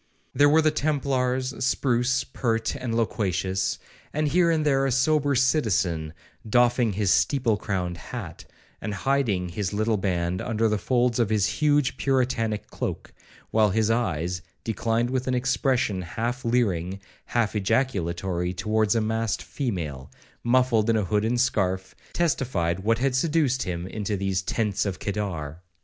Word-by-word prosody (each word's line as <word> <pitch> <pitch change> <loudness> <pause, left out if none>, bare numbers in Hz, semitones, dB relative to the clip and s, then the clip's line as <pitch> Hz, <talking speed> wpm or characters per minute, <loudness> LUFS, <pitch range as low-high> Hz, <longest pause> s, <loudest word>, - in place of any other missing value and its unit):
There 145 0 +5
were 160 +2 +4
the 155 - +4
templars, 130 -4 0
spruce, 125 -1 +1
pert, 115 -2 -1
and 125 -4 -3
loquacious; 95 -4 0 0.3
and 150 0 0
here 170 +3 +3
and 160 -2 +1
there 135 -2 +3
a - - 0
sober 140 +2 +2
citizen, 100 - +1 0.4
doffing 120 -1 +3
his 100 -1 +1
steeple 125 -6 +2
crowned 90 -4 -3
hat, - - -8 0.4
and 105 -2 -3
hiding 105 -7 0
his 95 +2 -3
little 110 +1 +1
band 90 -2 -1
under 115 -1 0
the 105 -1 0
folds 125 0 +1
of 115 -3 +2
his 105 -3 +2
huge 145 +2 +1
puritanic 125 -5 0
cloke, - - -5 0.4
while 110 -1 +4
his 110 +2 +1
eyes, 90 -6 -1 0.2
declined 115 +2 0
with 130 0 -1
an 130 - +1
expression 125 -5 +1
half 120 +8 -3
leering, 100 -6 0 0.3
half 115 -3 0
ejaculatory, 95 -6 0
towards 110 +3 +1
a 115 - +2
masked 110 -2 -1
female, 80 - -4 0.3
muffled 120 -2 +3
in 115 - +3
a 105 - 0
hood 105 +3 +1
and 120 +2 +1
scarf, 95 -7 0 0.2
testified 120 - 0
what 115 +4 +1
had 135 +2 +1
seduced 145 -3 +1
him 85 -1 -3
into 105 +1 -3
these 95 -1 -1
'tents 105 +1 -1
of 95 -2 -3
Kedar.' 90 -7 -4
115 Hz, 150 wpm, -25 LUFS, 95-130 Hz, 0.4 s, There